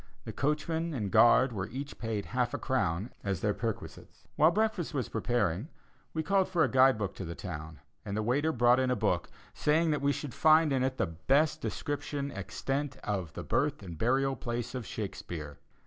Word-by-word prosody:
The - - -7
coachman 160 +3 -1
and 105 -6 -2
guard 125 +2 +6
were 95 -2 -3
each 135 +2 -6
paid 110 -3 -2
half 125 0 -1
a - - -1
crown 105 -6 -1
as 95 -3 -1
their 105 -1 +1
perquisites. 115 -1 -6
While 155 +2 +6
breakfast 210 -5 0
was 130 -4 -1
preparing, 105 - 0 0.4
we 160 - -2
called 195 +1 +2
for 175 -3 +3
a - - +4
guide 130 -1 +6
book 105 -3 -3
to - - -4
the 85 -1 -6
town, 80 -4 -7 0.2
and 100 0 -4
the 110 - 0
waiter 140 +8 +1
brought 120 -2 +4
in 130 -1 +1
a 125 - +2
book, 105 - 0 0.2
saying 160 +2 +2
that 150 -2 0
we 140 0 +3
should 140 -3 -4
find 155 +1 +5
in 130 - +1
it 130 0 -1
the - - +2
best 140 - +1
description 145 -2 -3
extant 135 +9 -3
of 95 -7 -3
the - - -6
birth 145 -4 0
and 85 -3 -7
burial 135 +3 +2
place 120 -1 -4
of 125 -3 -5
Shakespeare. 85 -8 -6
130 Hz, 195 wpm, -30 LUFS, 105-145 Hz, 0.4 s, guard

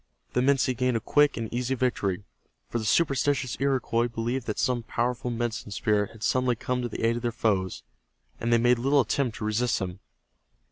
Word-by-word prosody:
The - - +2
Minsi 130 -1 +2
gained 125 0 +1
a - - -1
quick 145 +6 +3
and 115 -1 -2
easy 125 +2 0
victory, 105 -7 -1 0.4
for 120 - -2
the 110 - -4
superstitious 140 -1 +2
Iroquois 130 -3 +1
believed 120 +2 -3
that 105 - -2
some 125 -2 +1
powerful 120 +1 -2
Medicine 120 -2 -3
Spirit 105 0 +1
had 110 -1 -12
suddenly 130 -1 +2
come 125 +2 -2
to 120 - -3
the 105 - -5
aid 115 +1 +2
of - - -4
their 120 - -1
foes, 100 -5 -1 0.6
and 115 - -1
they 120 - +6
made 120 +1 +3
little 140 +3 +4
attempt 125 0 -1
to 105 - -4
resist 110 +3 +1
them. 90 0 -4
120 Hz, 195 wpm, -27 LUFS, 110-130 Hz, 0.6 s, they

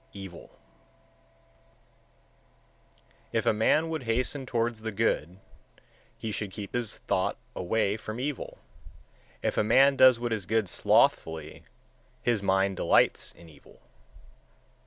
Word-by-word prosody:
Evil 95 -4 -10 2.8
116. - - -2
If - - 0
a - - +4
man 115 +9 +2
would 160 -1 -3
hasten 125 +3 -2
towards 115 -2 -1
the 110 0 -4
good, 90 -3 -1 0.8
he 110 - -5
should 105 0 -3
keep 100 +1 -8
his 120 -3 -2
thought - - -1 0.2
away 105 +3 0
from 110 +1 -7
evil; 140 +1 -4 0.9
if - - 0
a - - +3
man 135 +6 +5
does 130 -3 +6
what 120 -1 -2
is 100 -4 -4
good 110 -1 +1
slothfully, 80 -3 +1 0.6
his 120 -4 +1
mind 95 -1 +1
delights - - +2
in 85 - -16
evil. 75 -3 -18
110 Hz, 125 wpm, -28 LUFS, 95-120 Hz, 2.8 s, does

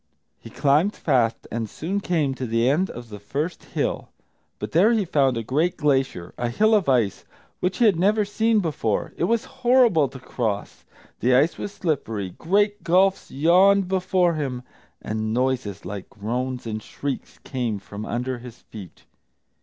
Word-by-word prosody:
He - - -11
climbed 150 +8 +2
fast, 120 -6 +1
and 115 -2 -3
soon 185 - -3
came 160 -8 0
to 130 -1 -5
the 115 +1 +1
end 165 +8 +2
of 120 -1 -9
the 105 -1 -8
first 150 - -4
hill. - - -2 0.5
But 105 - -6
there 195 +8 +5
he 215 -4 +1
found 135 -6 +2
a 115 - -2
great 155 +10 0
glacier, 135 - 0
a 120 0 0
hill 215 - +3
of 200 -9 +3
ice, 115 -7 +1 0.4
which 180 +1 -1
he 240 - +4
had 200 -6 +4
never 210 +3 +3
seen 220 +1 +2
before. 145 - -2
It - - 0
was 230 +3 +1 0.2
horrible 240 - +5
to - - -10
cross, 110 -5 -4 0.3
the 125 +1 +3
ice 145 +6 +2
was 205 - -4
slippery, 130 - -2
great 205 - +1
gulfs 190 +3 +2
yawned 185 +6 +4
before 185 -2 +2
him, 135 -5 -3 0.4
and 110 +1 -2
noises 125 -6 -1
like 100 +1 -6
groans 125 +4 -4
and 110 -1 -4
shrieks 140 +5 -5
came 120 -6 -2
from 100 +2 -8
under 125 +2 -3
his 120 -1 -11
feet. 100 -6 -12
140 Hz, 170 wpm, -24 LUFS, 115-185 Hz, 0.5 s, there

